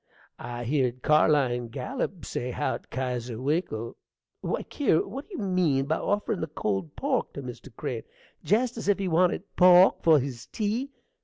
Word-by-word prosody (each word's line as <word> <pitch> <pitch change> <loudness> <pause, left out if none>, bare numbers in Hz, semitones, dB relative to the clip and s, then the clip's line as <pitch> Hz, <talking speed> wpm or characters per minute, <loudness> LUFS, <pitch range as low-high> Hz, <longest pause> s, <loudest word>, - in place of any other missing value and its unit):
I 120 0 -5
heered 125 -1 0
Carline 140 -6 +3
Gallup 195 - -4
say 125 - -3
how't 145 +4 -3
Kesier 125 -3 -3
Winkle 130 -5 -2 0.4
Why, - - -2
Kier, 260 - +1
what 270 - -8
do 395 - -8
you - - -3
mean 175 -8 +2
by 160 +3 0
offerin' 205 -2 -1
the 160 - -2
cold 95 - -3
pork - - -1
to - - -6
Mr. - - -8
Crane? - - -4 0.4
jest 230 +4 +1
as 225 - -5
if 205 - +4
he 195 -1 -2
wanted 175 +1 +2
pork 180 +1 +7
for 160 -3 +6
his 125 -3 -5
tea! 225 +6 -2
155 Hz, 165 wpm, -27 LUFS, 125-195 Hz, 0.4 s, pork